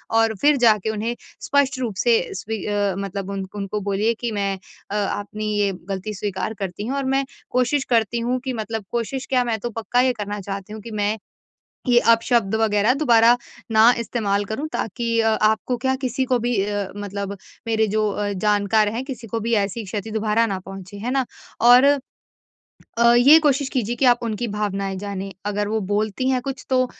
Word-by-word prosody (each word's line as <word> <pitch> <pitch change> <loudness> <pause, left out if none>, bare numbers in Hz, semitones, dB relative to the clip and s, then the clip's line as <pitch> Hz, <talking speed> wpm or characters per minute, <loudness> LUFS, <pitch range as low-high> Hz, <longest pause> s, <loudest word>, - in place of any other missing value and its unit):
और 225 0 +4
फिर 295 +1 +5
जाके 220 -4 +3
उन्हें 220 +2 -2 0.3
स्पष्ट 285 -2 +1
रूप 235 -6 -3
से 240 +5 +3 0.2
स्वी 220 +3 -4
अ, 205 -2 0
मतलब 195 0 -4
उनक 195 0 -6
उनको 205 +1 -3
बोलिए 205 +3 +1
कि 240 -1 -2
मैं 200 -2 -1 0.4
अ, - - -2
अपनी 205 +1 -2
ये 200 -1 +2 0.2
गलती 195 +2 -3
स्वीकार 200 0 -3
करती 195 +1 -4
हूँ 270 +3 -2
और 275 - -1
मैं 270 0 +1 0.3
कोशिश 255 +3 +1
करती 235 -1 +2
हूँ 245 +2 -1
कि 260 - -1
मतलब 220 -2 -4
कोशिश 240 +3 -2
क्या 255 -2 +3
मैं 230 -2 -1
तो 240 - -3
पक्का 230 +2 0
ये 255 0 +3
करना 205 -2 -5
चाहती 195 +1 -6
हूँ 220 - -7
कि 230 +2 -9
मैं 210 0 0 0.7
ये 240 -1 +6
अपशब्द 230 -3 +2
वग़ैरह 215 +2 +3
दोबारा 240 -4 +5 0.3
ना 220 +2 +7
इस्तेमाल 205 -4 -1
करूँ 235 +9 -4
ताकि 230 +1 -1
अ, 225 0 +3
आपको 220 +3 +1
क्या 260 +2 0
किसी 260 +1 0
को 250 - +4
भी 240 +1 0
अ, 205 -1 -2
मतलब 200 0 -5 0.3
मेरे 220 -1 +2
जो 215 +1 +1
अ, 205 0 -2
जानकार 210 +2 +2
हैं 240 +3 -3
किसी 250 -4 -7
को 225 +2 -2
भी 230 +2 -1
ऐसी 210 +3 -6
क्षति 210 +3 -5
दोबारा 220 +1 +1
ना 195 -3 -2
पहुँचे। 195 +1 -10
है 230 +5 -3
ना? 265 -1 +1 0.4
और 245 +2 +8 1.1
अ, 235 0 +6
ये 270 +6 +8
कोशिश 285 -3 +1
कीजिए 240 -3 -1
कि 265 - +1
आप 240 -1 +5
उनकी 230 +1 -2
भावनाएँ 200 -2 -2
जानें। 195 0 -5
अगर 205 0 -1
वो 220 +1 0
बोलती 215 +4 0
हैं 255 -1 +1
कुछ 270 0 -6
तो 255 -1 +3
220 Hz, 195 wpm, -22 LUFS, 205-240 Hz, 1.1 s, और